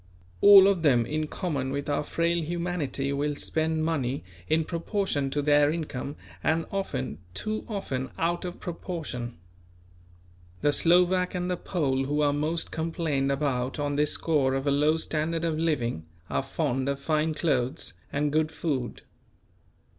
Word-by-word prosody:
All 200 -1 +10
of 195 -4 +2
them 125 -7 +4
in 155 +3 -2
common 145 -6 -2
with 140 +1 -3
our 145 - +1
frail 170 +2 0
humanity 155 -5 -2
will 145 +1 -1
spend 160 +1 0
money 140 -5 -1 0.2
in 160 +1 +2
proportion 170 -4 -1
to 145 +1 -1
their 145 0 +5
income 150 -4 -4 0.3
and 160 +1 +1
often, 80 - -3 0.2
too 215 - -3
often, 135 - -3
out 170 +1 0
of 180 0 -6
proportion. 160 - -5 1.2
The 145 - +3
Slovak 180 +4 +3
and 180 0 -1
the - - +1
Pole 135 -8 0
who 145 +2 0
are 145 -1 +3
most 155 +3 -1
complained 160 -4 -1
about 135 -3 -1
on 145 -1 -1
this 150 +1 +2
score 140 -5 +1
of 135 +1 -2
a 140 - +2
low 150 +3 +3
standard 160 +1 -1
of 160 -2 0
living, 120 - -1 0.2
are - - +1
fond 135 -1 -1
of 140 0 -1
fine 155 +1 0
clothes 135 -2 0 0.2
and 145 0 0
good 155 0 +2
food. 150 -6 -3
150 Hz, 155 wpm, -27 LUFS, 140-165 Hz, 1.2 s, All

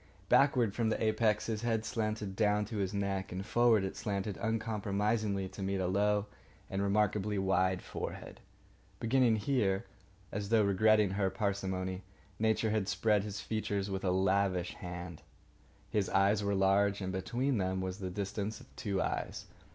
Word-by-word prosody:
Backward, 125 -4 +4
from 115 0 0
the - - -1
apex, 110 -1 +2
his 110 -2 -2
head 115 -2 0
slanted 105 -3 -2
down 105 -1 +2
to 110 +1 -5
his 95 -2 -1
neck 100 -1 -2
and 95 +2 -4
forward 115 -2 +4
it 95 - -3
slanted 100 -1 -2
uncompromisingly 105 -2 -1
to 100 - -9
meet 95 0 -1
a 95 - 0
low 100 +2 +2 0.5
and 95 +1 -1
remarkably 105 0 +1
wide 95 -1 +1
forehead. - - -6 0.6
Beginning 120 -1 +3
here, 105 -4 +1 0.5
as 100 0 -4
though 110 -2 +4
regretting 105 +1 +4
her 95 0 +1
parsimony, 95 -1 -2 0.4
Nature 110 0 +2
had 105 -3 0
spread 105 +1 +2
his 105 -1 -5
features 100 -2 -2
with 95 0 -3
a 95 - +1
lavish 95 -1 +1
hand. 90 -2 -7 0.7
His 105 -3 +1
eyes 100 +2 +3
were 100 0 +1
large, 100 +1 +3
and 95 -1 -3
between 120 +7 -1
them 95 0 0
was 95 +1 -4
the 95 -2 -3
distance 100 +3 -3
of - - -18
two 100 -3 -2
eyes. - - -2
100 Hz, 160 wpm, -32 LUFS, 95-110 Hz, 0.7 s, Backward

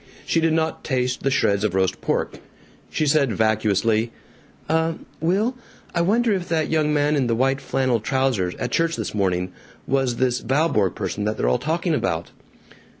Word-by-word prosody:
She 165 - +2
did 160 -1 +2
not 160 0 -1
taste 125 -2 -1
the 135 - +1
shreds 100 -7 +2
of 105 -4 0
roast 95 -1 0
pork. - - -1 0.5
She 155 - 0
said 140 -5 +3
vacuously: 110 +1 +1 0.6
"Uh 160 +1 +1 0.3
Will, 200 +10 +1 0.4
I 170 - +1
wonder 225 +6 +2
if 185 -3 -3
that 160 -2 0
young 155 -1 +2
man 150 0 +2
in 135 -4 +1
the 115 - +1
white 135 +3 +1
flannel 130 -3 0
trousers, 120 -7 0
at - - -4
church 165 0 +1
this - - -4
morning, 90 -3 0 0.3
was 135 -2 +1
this 125 -1 0
Valborg 130 - +1
person 105 - -3
that 105 +1 -1
they're - - 0
all 60 - +2
talking 165 +2 -1
about?" 85 - -1
135 Hz, 175 wpm, -23 LUFS, 110-160 Hz, 0.6 s, said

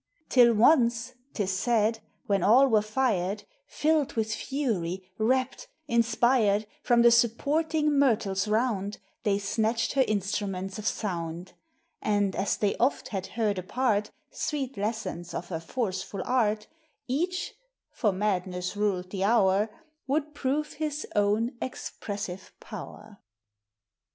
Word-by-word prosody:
Till 240 -3 +6
once, 235 0 +4 0.2
't 210 - 0
is 190 - -1
said, 225 +2 +1 0.3
when 200 -1 +1
all 255 +6 +6
were 220 -4 +4
fired, 210 -4 0 0.2
Filled 310 -2 +1
with 220 -1 -1
fury, 190 -10 -2
rapt, 260 - 0 0.2
inspired, 230 -2 +3 0.2
From 240 -1 +4
the 235 - +7
supporting 295 +6 +2
myrtles 210 -7 +2
round 210 -2 0 0.2
They 205 -4 +1
snatched 220 +3 0
her 270 -1 +4
instruments 195 -1 -2
of 215 - -3
sound; 175 -3 -3 0.5
And, 205 -2 +1
as 195 - 0
they 205 -2 +1
oft 250 +4 +1
had 195 -3 -3
heard 210 -4 +1
apart 210 +2 0 0.2
Sweet 275 -3 -3
lessons 200 -5 -4
of 175 - -5
her 165 -3 -3
forceful 190 0 -3
art, 215 -4 +1 0.4
Each 350 +8 -1 0.4
(for 210 - +1
madness 185 -2 -2
ruled 190 -3 -1
the 195 -1 -2
hour) 205 -1 +3 0.4
Would 300 +2 -1
prove 295 +2 -1
his 305 0 -3
own 210 +3 +2
expressive 200 -6 -5
power. 210 -2 -10
215 Hz, 125 wpm, -28 LUFS, 195-255 Hz, 0.5 s, the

